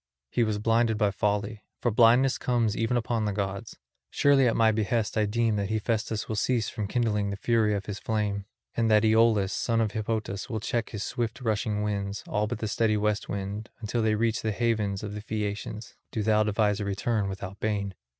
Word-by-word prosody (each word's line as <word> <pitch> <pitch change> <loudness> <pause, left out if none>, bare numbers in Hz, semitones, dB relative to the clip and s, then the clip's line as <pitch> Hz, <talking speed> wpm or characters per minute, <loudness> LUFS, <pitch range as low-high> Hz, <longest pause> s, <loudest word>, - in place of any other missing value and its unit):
He 120 - +2
was 110 -2 0
blinded 115 +1 +2
by 105 -2 +2
folly. 105 +1 -1 0.2
For 120 - +1
blindness 120 +4 +5
comes 115 -4 +1
even 115 +2 +1
upon 115 -1 -1
the 105 - 0
gods. 100 -1 -4 0.3
Surely 140 -2 +4
at 115 - +2
my 115 -1 +4
behest 110 0 0
I 105 -1 +2
deem 115 0 +1
that 100 -1 -1
Hephaestus 110 0 -1
will 110 - -2
cease 115 0 +1
from 105 -2 -4
kindling 105 -3 0
the 100 - -3
fury 110 0 +2
of 100 - -3
his 100 -1 -5
flame, 105 -2 -1 0.3
and 115 -1 +1
that 110 0 +5
Aeolus, 110 -3 +4
son 115 -1 0
of 110 -2 +1
Hippotas, 110 -1 -3
will 110 -3 -2
check 115 +1 -2
his 105 -2 -4
swift 115 -2 -3
rushing 110 -2 0
winds, 100 -1 -2
all 105 +1 0
but - - -3
the 110 - -3
steady 110 -1 +1
west 105 0 -1
wind, 100 +2 -4
until 115 +1 -2
they 110 -1 +2
reach 115 +1 0
the 110 - -1
havens 105 -3 0
of 105 -1 -5
the 105 - -5
Phaeacians; 105 0 -4 0.2
do 110 - -2
thou 110 0 +3
devise 105 -1 +1
a - - -2
return 100 +1 -1
without 95 0 -7
bane. 100 -2 -1
110 Hz, 205 wpm, -27 LUFS, 105-115 Hz, 0.3 s, blindness